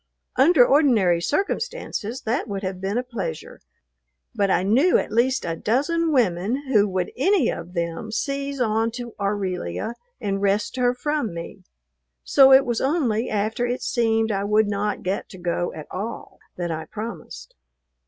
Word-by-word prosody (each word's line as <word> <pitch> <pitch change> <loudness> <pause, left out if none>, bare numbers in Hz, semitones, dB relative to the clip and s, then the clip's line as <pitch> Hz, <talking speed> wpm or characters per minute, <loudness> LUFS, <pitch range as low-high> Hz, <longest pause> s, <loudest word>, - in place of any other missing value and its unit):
Under 270 -1 +6
ordinary 230 - +3
circumstances 295 - -2
that 235 +3 -1
would 200 -1 -4
have 185 -1 -4
been 195 +4 -1
a 250 - 0
pleasure, 195 -11 -6 0.7
but 200 -1 +1
I 180 - +2
knew 255 - +4
at - - -3
least 255 +4 +1
a 165 - -2
dozen 305 - 0
women 235 - +1
who 210 -1 +5
would 185 -1 -2
any 350 - +2
of 175 +2 -8
them 170 +6 -3
seize 275 +3 -3
on 225 -1 +1
to 240 -2 -7
Aurelia 195 - -2 0.3
and 195 -2 -2
wrest 200 +3 0
her 245 -1 +2
from 290 - -2
me, 170 0 -8 0.6
so 270 -1 +6
it 265 +1 +7
was 240 -2 -1
only 260 -6 0
after 220 +3 -1
it 245 +1 -3
seemed 225 -2 +1
I 195 -1 -1
would 210 +1 +3
not 205 0 -2
get 190 +2 -2
to 185 - -11
go 175 0 -2
at 155 - -8
all 210 +5 -6 0.2
that 175 -1 -3
I 160 0 -4
promised. 175 - -8
220 Hz, 165 wpm, -23 LUFS, 190-255 Hz, 0.7 s, it